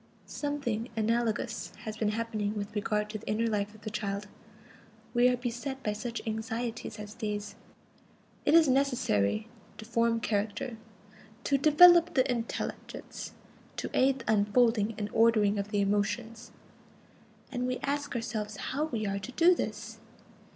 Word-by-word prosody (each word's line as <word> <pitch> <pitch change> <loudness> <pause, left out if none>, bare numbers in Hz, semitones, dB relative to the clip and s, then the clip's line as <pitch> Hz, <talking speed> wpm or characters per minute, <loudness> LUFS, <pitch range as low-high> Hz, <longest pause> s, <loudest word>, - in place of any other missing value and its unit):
Something 265 -6 -3
analogous 225 +1 -1
has 215 -1 -5
been 220 -1 0
happening 215 -1 -2
with 205 0 -4
regard 210 0 0
to 215 - -4
the - - -15
inner 220 +2 +1
life 210 -1 -1
of 215 - -16
the 215 - -6
child. 205 -1 -3 0.9
We 245 +1 +5
are 250 - +1
beset 250 +3 -4
by 210 - 0
such 230 +2 -5
anxieties 225 +1 -4
as 210 0 -8
these: 210 -2 -4 0.9
it 300 - +4
is 330 -2 +7
necessary 235 - +1 0.3
to 220 - -9
form 230 0 +1
character, 220 +3 -2 0.7
to 280 - +2
develop 345 +4 +7
the 260 -1 +4
intelligence, 235 -1 -5 0.4
to - - -4
aid 265 +1 +3
the 220 -1 +1
unfolding 215 +1 +3
and 205 - -2
ordering 215 -3 +4
of 200 - -2
the 205 -1 +1
emotions. 215 +3 -1 1.0
And 250 -1 -1
we 255 0 -1
ask 285 -1 -2
ourselves 215 -3 -3
how 285 +8 -2
we 230 -8 -3
are 200 0 -1
to 220 +6 -7
do 345 +5 +6
this. 220 -6 -5
225 Hz, 150 wpm, -30 LUFS, 210-250 Hz, 1.0 s, is